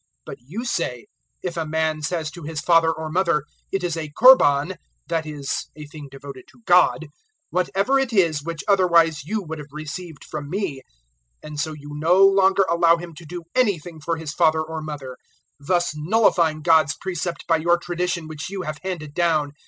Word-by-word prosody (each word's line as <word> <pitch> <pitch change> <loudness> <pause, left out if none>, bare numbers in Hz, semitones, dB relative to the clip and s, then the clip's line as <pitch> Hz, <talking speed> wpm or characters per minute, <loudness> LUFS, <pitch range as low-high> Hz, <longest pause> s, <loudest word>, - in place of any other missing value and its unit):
007:011 - - -47 0.2
But - - -8
*you* 220 - -5
say, 125 - -2 0.4
'If 175 -2 -4
a 165 - -1
man 160 0 -1
says 155 0 -2
to 175 - -11
his 155 0 -5
father 165 -1 +4
or 160 -1 -5
mother, 170 -4 +1 0.3
It 195 -1 -1
is 175 -2 -1
a 160 -2 -5
Korban 185 - +6 0.3
(that 165 -2 -2
is, 145 -2 -4
a 150 -1 -9
thing 150 -1 -10
devoted 135 -1 -10
to - - -22
God), 175 -2 +4 0.5
whatever 195 +8 +1
it 265 -2 -1
is, 170 -8 +2
which 165 +1 -5
otherwise 170 -6 +3
you 210 +4 -2
would 160 -2 -7
have 150 -1 -10
received 155 +1 -7
from 145 -2 -7
me 180 -7 -3 0.3
' - - -43
007:012 155 - -8
And 150 -1 -6
so 155 +2 -2
you 145 -1 -11
no 170 +6 +4
longer 195 0 +4
allow 170 0 +4
him 170 0 -9
to 160 +2 -12
do 175 +1 -7
anything 175 -10 0
for 165 +2 -2
his 160 -2 -6
father 160 0 +3
or 160 0 -6
mother, 145 -4 -7 0.4
007:013 140 - -15
thus 175 -3 +1
nullifying 165 -2 +2
God's 160 -3 +4
precept 175 -2 -4
by 165 - +3
your 170 +2 +2
tradition 175 -1 -3
which 155 0 -6
you 195 -1 -5
have 155 -2 -5
handed 170 -6 -5
down. 155 -4 +1
160 Hz, 200 wpm, -22 LUFS, 150-180 Hz, 0.5 s, Korban